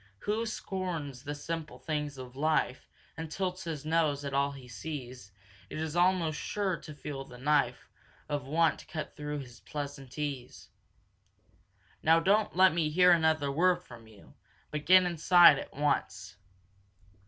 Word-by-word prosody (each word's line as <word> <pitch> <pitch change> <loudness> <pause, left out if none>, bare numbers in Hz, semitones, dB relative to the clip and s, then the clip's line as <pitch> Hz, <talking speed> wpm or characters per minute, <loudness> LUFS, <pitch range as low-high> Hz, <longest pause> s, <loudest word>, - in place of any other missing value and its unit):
"Who 220 +2 -1
scorns 175 - -4
the 145 +1 -5
simple 160 +1 -5
things 150 -2 -3
of 130 -1 -9
life 150 -3 0 0.3
And 160 0 -6
tilts 185 0 -3
his 155 -3 -5
nose 155 -3 +1
at 140 - -4
all 140 +1 +2
he 135 -2 -11
sees, 125 -5 -7 0.4
Is 155 0 -4
almost 175 -3 +2
sure 195 -4 -1
to 150 - -11
feel 145 -2 -6
the 125 -2 -13
knife 145 +4 +1 0.4
Of 145 -3 -3
want 160 +2 +1
cut 160 -4 -6
through 150 -1 -4
his 120 -2 -12
pleasant 140 -3 -7
ease. 140 -4 -5 1.3
"Now 165 +1 +5
don't 200 +4 +2
let 185 -1 +6
me 160 -2 +1
hear 180 +3 +5
another 160 -4 +3
word 180 +5 +2
from 115 -2 -13
you, 105 -3 -17 0.4
but 150 0 -5
get 185 +1 +8
inside 170 -3 +6
at - - -8
once!" 95 -10 -1
150 Hz, 150 wpm, -30 LUFS, 140-170 Hz, 1.3 s, get